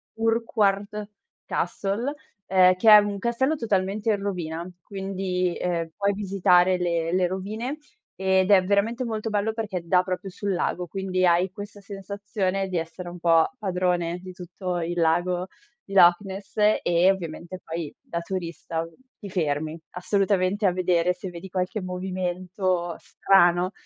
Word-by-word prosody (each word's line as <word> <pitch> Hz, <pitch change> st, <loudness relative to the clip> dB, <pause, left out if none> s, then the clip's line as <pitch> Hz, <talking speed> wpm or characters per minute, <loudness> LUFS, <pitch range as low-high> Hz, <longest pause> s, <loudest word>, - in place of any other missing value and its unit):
Urquhart 210 Hz, -2 st, 0 dB, 0.4 s
Castle, 215 Hz, +8 st, -2 dB, 0.3 s
ehm, 185 Hz, -1 st, +5 dB
che 200 Hz, +5 st, +4 dB
è 210 Hz, -, +12 dB
un 205 Hz, -1 st, +1 dB
castello 240 Hz, +8 st, 0 dB
totalmente 210 Hz, -2 st, 0 dB
in 205 Hz, -, 0 dB
rovina. 175 Hz, -3 st, -4 dB
Quindi, 190 Hz, -2 st, -2 dB
ehm, 170 Hz, -2 st, -2 dB
puoi 200 Hz, 0 st, +1 dB
visitare 185 Hz, -2 st, +3 dB
le 170 Hz, -2 st, -1 dB
le 185 Hz, -1 st, +3 dB
rovine 215 Hz, +9 st, -4 dB, 0.4 s
ed 190 Hz, +1 st, +2 dB
è 195 Hz, -2 st, +7 dB
veramente 220 Hz, +6 st, +1 dB
molto 220 Hz, -1 st, -3 dB
bello 210 Hz, +1 st, 0 dB
perché 210 Hz, -6 st, -3 dB
dà 180 Hz, +1 st, +4 dB
proprio 185 Hz, +1 st, -4 dB
sul 200 Hz, +2 st, -3 dB
lago, 180 Hz, 0 st, -1 dB
quindi 185 Hz, +1 st, -1 dB
hai 175 Hz, +1 st, +3 dB
questa 205 Hz, +1 st, -9 dB
sensazione 195 Hz, -1 st, -3 dB
di 185 Hz, -, -2 dB
essere 165 Hz, +2 st, -5 dB
un 175 Hz, 0 st, -9 dB
po' 165 Hz, -1 st, +4 dB
padrone 180 Hz, -4 st, -1 dB
di 185 Hz, 0 st, -9 dB
tutto 180 Hz, 0 st, -5 dB
il 175 Hz, +1 st, -3 dB
lago 175 Hz, +2 st, +1 dB, 0.4 s
di 195 Hz, -, -11 dB
Loch 175 Hz, -1 st, +7 dB
Ness 195 Hz, 0 st, -8 dB, 0.3 s
e, 175 Hz, +2 st, +4 dB
ovviamente, 175 Hz, 0 st, -6 dB
poi 165 Hz, -2 st, -5 dB
da 170 Hz, -, -4 dB
turista 170 Hz, -2 st, -4 dB, 0.3 s
ti 200 Hz, -, -8 dB
fermi 155 Hz, -3 st, -1 dB
assolutamente 195 Hz, +2 st, +1 dB
a 190 Hz, -, +5 dB
vedere 180 Hz, -1 st, +1 dB
se 185 Hz, +1 st, -7 dB
vedi 175 Hz, +2 st, -9 dB
qualche 185 Hz, +3 st, -2 dB
movimento 185 Hz, -1 st, -2 dB
strano. 180 Hz, -1 st, +3 dB
185 Hz, 145 wpm, -25 LUFS, 175-200 Hz, 0.4 s, è